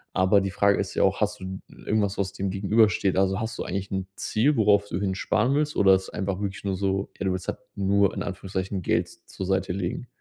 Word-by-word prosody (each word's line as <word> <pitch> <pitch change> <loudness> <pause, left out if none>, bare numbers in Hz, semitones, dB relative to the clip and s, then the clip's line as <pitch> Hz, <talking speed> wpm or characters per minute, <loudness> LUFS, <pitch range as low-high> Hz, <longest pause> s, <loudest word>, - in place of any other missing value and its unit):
Aber 95 +2 +4
die 95 -1 -2
Frage 100 0 +3
ist - - -2
ja - - +2
auch: - - +2
„Hast - - 0
du 95 0 -6
irgendwas, 105 -2 -1
was 100 -1 -2
dem 95 0 -2
Gegenüber 105 +3 +3
steht?” 95 -3 0
Also, 95 +1 +2
hast 110 +1 -4
du - - -3
eigentlich 95 +1 -4
'n 95 -1 -2
Ziel, 135 +6 +1
worauf 100 -1 +4
du 90 - -2
hin 95 -2 -1
sparen 120 +7 +1
willst, 150 0 0
oder 95 -1 +6
ist 95 0 -3
einfach 100 -1 -3
wirklich 100 -1 -4
nur 95 -1 0
so: 95 +1 -1
„Ey, 100 - -4
du 95 - +2
willst 95 -1 -4
halt - - -3 0.2
nur 100 0 +2
in - - -4
Anführungszeichen 95 0 -4
Geld - - +1
z - - -19
zur 95 - -5
Seite 95 -1 0
legen?” 95 +5 -3
95 Hz, 245 wpm, -26 LUFS, 95-100 Hz, 0.2 s, oder